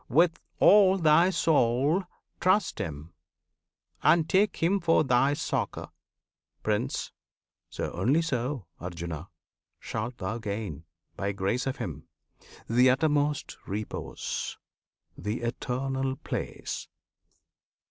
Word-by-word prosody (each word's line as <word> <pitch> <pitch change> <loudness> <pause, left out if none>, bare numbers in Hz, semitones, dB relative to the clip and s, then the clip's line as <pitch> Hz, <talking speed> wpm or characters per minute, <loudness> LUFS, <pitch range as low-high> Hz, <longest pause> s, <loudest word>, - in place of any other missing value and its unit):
With 165 +4 +4 0.2
all 195 -2 +7
thy 165 +1 +5
soul 150 +1 +2 0.3
Trust 190 +3 +2
Him, 80 +2 -5 0.9
and 165 -2 +4
take 195 +2 +3
Him 185 +5 +2
for 165 -3 +3
thy 135 +1 +3
succour, - - -3 0.7
Prince! - - -1 0.6
So - - -4
only 130 - +2
so, 130 - -2
Arjuna! 85 -1 -6 0.5
shalt 115 +3 -4
thou 115 +2 -3
gain 100 -8 -5 0.3
By 100 +1 -2
grace 100 +7 -1
of 135 +1 -2
Him 80 - -6 0.6
the 125 +3 +5
uttermost 145 +2 +1
repose, 105 +2 -4 0.6
The 105 +6 -3
Eternal 130 +2 -2
Place! - - -5
130 Hz, 100 wpm, -28 LUFS, 105-160 Hz, 0.9 s, all